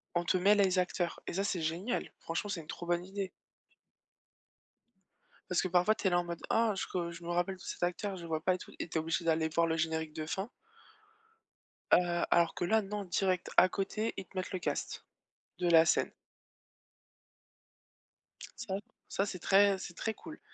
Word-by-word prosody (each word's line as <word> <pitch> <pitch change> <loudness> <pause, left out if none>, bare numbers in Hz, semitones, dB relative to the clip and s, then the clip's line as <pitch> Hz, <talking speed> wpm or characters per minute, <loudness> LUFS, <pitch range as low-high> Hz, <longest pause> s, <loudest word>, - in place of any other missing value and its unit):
on 175 - +2
te 175 - +2
met 200 +3 +5
les 190 -2 +3
acteurs 175 -1 -1
et - - -3
ça, 195 +3 0
c'est 190 -4 -1
génial 170 +10 -2
franchement, 170 +5 -3
c'est 180 -4 -2
une 155 - -16
trop 175 - -6
bonne 175 0 +1
idée. 195 0 -4 2.2
Parce 180 - +3
que 185 - -1
parfois, 180 +4 +4
tu 215 - -3
es - - +5
là, 175 - +3
en 175 - 0
mode, 170 -1 -5
ah, 225 -1 +3
je - - -2
re 170 -1 -1
je 170 0 -10
me 170 - -7
rappelle 175 +2 0
de - - -21
cet - - -7
acteur, 180 +3 -1
je 175 - -8
vois 160 -1 -1
pas 185 +2 +3
et - - -4
tout, - - -11
et - - -4
tu 165 - -5
es - - +3
obligé 165 +1 -1
d'aller 160 -1 +2
voir 170 0 +4
le 160 0 0
générique 160 -1 -1
de 155 - -4
fin. 190 +6 -3 1.4
Heu, 175 -1 +4
alors 170 -1 +4
que - - -2
là, 220 +5 +3
non, 205 +1 -4
direct 185 0 0
à 185 - +8
côté, 205 +4 -2
ils 195 - -5
te 195 - -19
mettent 185 +1 -3
le 185 - -1
casting 175 - -3 0.6
de 175 -1 +2
la 165 -1 +7
scène. - - +2 2.5
Ça 190 - -3 0.3
ça, 195 - 0
c'est 190 - -5
très 195 +2 +4
c'est 180 -2 -7
très 220 +5 -2
cool. 320 +6 -11
180 Hz, 205 wpm, -32 LUFS, 170-195 Hz, 2.5 s, à